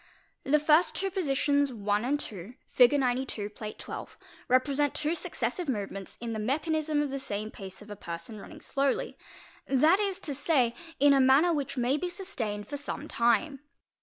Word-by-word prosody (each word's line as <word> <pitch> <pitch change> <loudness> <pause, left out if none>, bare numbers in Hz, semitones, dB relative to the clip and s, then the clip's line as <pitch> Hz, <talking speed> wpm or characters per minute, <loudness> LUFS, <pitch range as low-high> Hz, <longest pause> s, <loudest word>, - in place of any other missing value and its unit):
The 290 +3 +4
two 300 - -6
first 350 +5 +3
positions 285 -5 +2
Land 220 +6 -1
IL., 200 +3 -9 0.2
Fig. 255 +3 +5
92, 250 -5 -1
(Plate 215 0 -8
XII) - - -7 0.3
represent 280 +3 +2
two 305 +2 0
successive 345 -1 -2
movements 200 -4 -4
in 230 -1 -4
the 220 - -3
mechanism 305 +5 0
of 285 - -3
the 275 - -3
same 215 -3 -4
pace 190 +1 -9
of 210 - -12
a - - -5
person 170 +3 -7
running 305 +9 -11
slowly, 275 -2 -1 0.5
that 310 +8 +4
is 395 -2 -1
to 295 - -3
say, 270 -4 +2 0.3
in 280 -1 +6
manner 285 +7 +5
which 280 -3 -3
may 250 +3 +2
be 360 +3 -2
sustained 225 - -4
for 285 - -4
some 285 +1 -5
time. 240 +4 +1
275 Hz, 165 wpm, -29 LUFS, 220-300 Hz, 0.5 s, in